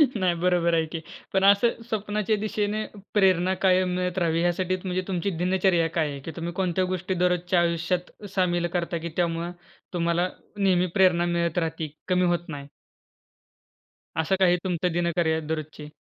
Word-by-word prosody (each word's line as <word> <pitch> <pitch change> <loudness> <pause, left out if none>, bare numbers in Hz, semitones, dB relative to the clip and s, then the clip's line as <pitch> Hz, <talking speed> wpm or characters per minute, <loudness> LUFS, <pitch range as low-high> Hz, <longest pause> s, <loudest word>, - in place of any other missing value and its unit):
नाही 185 -4 +1
बरोबर 170 -1 +2
आहे 160 -1 +2
की. 160 +1 -5 0.3
पण 190 - +2
असं 200 +4 +4
स्वप्नाच्या 210 0 0
दिशेने 215 0 -1 0.3
प्रेरणा 185 -2 +3
कायम 185 0 +4
मिळत 180 0 -2
राहावी 165 -2 +1
यासाठीच 180 +1 0
म्हणजे 185 0 -1
तुमची 185 0 -1
दिनचर्या 180 -2 +2
काय 160 -2 0
आहे, 140 - -6
की 150 +4 -7
तुम्ही 170 0 -4
कोणत्या 185 0 0
गोष्टी 185 +1 -2
दररोजच्या 180 0 +1
आयुष्यात 170 +1 -1 0.2
सामील 175 -2 +1
करता 170 -1 -1
की 170 +1 -5
त्यामुळं 170 0 0 0.4
तुम्हाला 170 +1 +1 0.3
नेहमी 185 -2 +3
प्रेरणा 180 -2 +4
मिळत 170 -1 0
राहते, 160 -2 -1 0.2
कमी 180 -1 +2
होत 175 0 0
नाही? 140 -2 -6 1.5
असं 160 +4 +2
काही 180 -2 +4
तुमचं 180 -1 0
दिनचर्या 170 -2 +1
दररोजची? 155 -1 -5
175 Hz, 155 wpm, -25 LUFS, 170-185 Hz, 1.5 s, असं